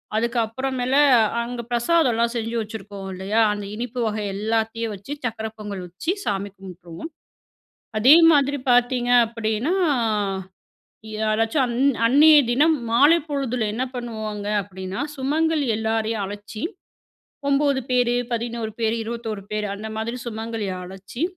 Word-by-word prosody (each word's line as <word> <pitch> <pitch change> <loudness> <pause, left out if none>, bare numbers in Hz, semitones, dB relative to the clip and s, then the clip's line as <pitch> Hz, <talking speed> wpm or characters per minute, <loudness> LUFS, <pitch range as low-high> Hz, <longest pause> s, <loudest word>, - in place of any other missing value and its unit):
அதுக்கு 235 +2 0
அப்பறமேல 260 +2 -2 0.5
அங்க 235 0 -4
பிரசாதம்லாம் 240 -2 +2
செஞ்சு 230 0 -2
வச்சுருக்கோம் 205 -2 -7
இல்லையா? 195 +4 -1
அந்த 205 -1 -5
இனிப்பு 245 +2 -5
வகை 215 -1 -2
எல்லாத்தையும் 225 +1 -1
வச்சு 200 +9 -7
சக்கரை 220 -2 -3
பொங்கல் 205 -3 -6
வச்சு 190 - -3
சாமி 200 0 -1
கும்ப்ட்டுருவோம். 180 - -9 0.9
அதே 250 +7 +7 0.2
மாதிரி 285 -1 +3
பாத்தீங்க 245 0 +3 0.2
அப்டீன்னா 225 - -1 1.5
யாராச்சும் 220 +5 +1
அந் 240 -1 -3 0.3
அந்நிய 295 +6 +7 0.2
தினம் 305 +6 +4
மாலை 290 +8 +6
பொழுதுல 265 -5 -1
என்ன 250 - -1
பண்ணுவாங்க 220 -4 -5 0.2
அப்டீன்னா, 190 +1 -6 0.2
சுமங்கலி 300 +2 +1
எல்லாரயும் 220 -1 -1
அழச்சி 205 +2 -7 0.9
9 280 -1 +2
பேரு, 245 -1 +3 0.2
11 235 -1 -3
பேரு, 225 0 +1
21 225 -2 -5
பேரு 210 -1 -1
அந்த 215 +2 -7
மாதிரி 225 +2 -3
சுமங்கலி 225 -2 -4 0.2
அழச்சு, 190 +7 -9
230 Hz, 120 wpm, -23 LUFS, 215-250 Hz, 1.5 s, அதே